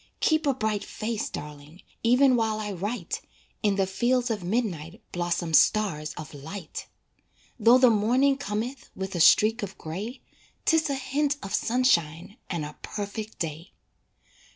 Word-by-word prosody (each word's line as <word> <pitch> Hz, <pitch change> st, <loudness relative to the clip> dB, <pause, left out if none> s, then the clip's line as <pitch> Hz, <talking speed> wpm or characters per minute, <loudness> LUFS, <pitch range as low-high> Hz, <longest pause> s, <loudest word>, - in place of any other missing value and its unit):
Keep 315 Hz, -1 st, +2 dB
a 275 Hz, -, +3 dB
bright 215 Hz, -4 st, -1 dB
face, 220 Hz, 0 st, -3 dB
darling 150 Hz, +3 st, -9 dB, 0.2 s
Even 250 Hz, +3 st, +5 dB
while 220 Hz, -2 st, 0 dB
I 210 Hz, -1 st, -3 dB
write, 195 Hz, +1 st, -3 dB, 0.4 s
In 205 Hz, -2 st, +2 dB
the 195 Hz, -1 st, +2 dB
fields 240 Hz, +6 st, +1 dB
of 210 Hz, -4 st, -3 dB
midnight 175 Hz, -6 st, -2 dB
Blossom 175 Hz, -1 st, -2 dB
stars 155 Hz, -5 st, +3 dB
of 155 Hz, -, -8 dB
light. 160 Hz, +4 st, -7 dB, 0.7 s
Though 230 Hz, +3 st, +7 dB
the 255 Hz, -2 st, +6 dB
morning 250 Hz, +6 st, +3 dB
cometh 240 Hz, 0 st, -4 dB
With 190 Hz, 0 st, -4 dB
a 175 Hz, -, -2 dB
streak 215 Hz, +7 st, +5 dB
of 195 Hz, -2 st, -6 dB
gray, 205 Hz, -, -6 dB, 0.4 s
'Tis 320 Hz, -2 st, +3 dB
a 280 Hz, -, 0 dB
hint 280 Hz, +2 st, 0 dB
of 195 Hz, -, -6 dB
sunshine 200 Hz, -6 st, +1 dB
And 170 Hz, -5 st, -2 dB
a 150 Hz, -, -9 dB
perfect 210 Hz, +1 st, -5 dB
day. 165 Hz, +2 st, -5 dB
210 Hz, 150 wpm, -27 LUFS, 175-245 Hz, 0.7 s, Though